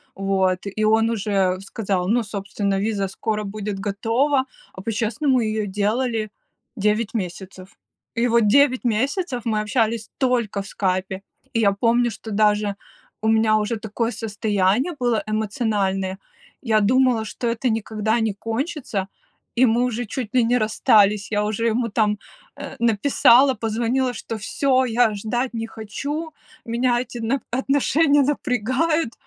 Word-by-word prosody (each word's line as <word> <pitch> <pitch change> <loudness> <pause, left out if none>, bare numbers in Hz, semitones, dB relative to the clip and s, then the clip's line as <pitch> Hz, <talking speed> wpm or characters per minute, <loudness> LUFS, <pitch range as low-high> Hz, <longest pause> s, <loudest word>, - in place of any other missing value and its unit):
вот, 190 -1 +1
и 200 +2 -3
он 220 +1 +3
уже 195 -4 0
сказал: 195 -3 -2
"Ну, 235 +4 +2
собственно, 200 -1 -2
виза 200 -1 -1
скоро 215 +3 -3
будет 205 0 -5
готова". 230 +8 +1 0.3
А 190 - -9
по-честному 235 +6 0
ее 215 -2 -1
делали 215 +2 -1 0.4
9 210 +1 0
месяцев. 190 0 -6 0.4
И 235 +1 +2
вот 230 -2 +3
9 260 +3 +4
месяцев 255 - 0
мы 220 -2 0
общались 220 0 0
только 240 -6 0
в 195 - -9
Скайпе, 190 0 -2 0.3
И 230 - +1
я 200 -3 +3
помню, 235 +3 +2
что 220 0 -9
даже 210 -1 +2 0.5
у 220 - -1
меня 220 -1 +4
уже 215 +2 -1
такое 220 +2 -2
состояние 215 - 0
было 240 -4 +1
эмоциональное, 205 -3 -1 0.4
я 220 -4 +2
думала, 245 +1 +3
что 235 +3 -4
это 235 +2 0
никогда 220 0 -1
не 220 -2 0
кончится, 225 - -3 0.5
и 255 +2 +5
мы 235 +1 +2
уже 245 -1 -2
чуть 225 0 -5
ли 250 - +5
не 240 +2 +2
расстались. 210 -1 +3
Я 210 0 +1
уже 215 +2 -2
ему 230 +1 +1
там, 210 0 +1 0.4
э, - - -8
написала, 235 +3 +4
позвонила, 235 +4 -1
что 225 0 -6
всё, 260 +4 +1
я 235 -2 +2
ждать 240 +5 -2
не 225 -1 -3
хочу, 285 +9 -5 0.3
меня 240 +1 +1
эти 250 -1 -8
нап 235 +4 -1
отношения 285 +3 +2
напрягают, 265 +2 0
220 Hz, 145 wpm, -22 LUFS, 205-245 Hz, 0.5 s, и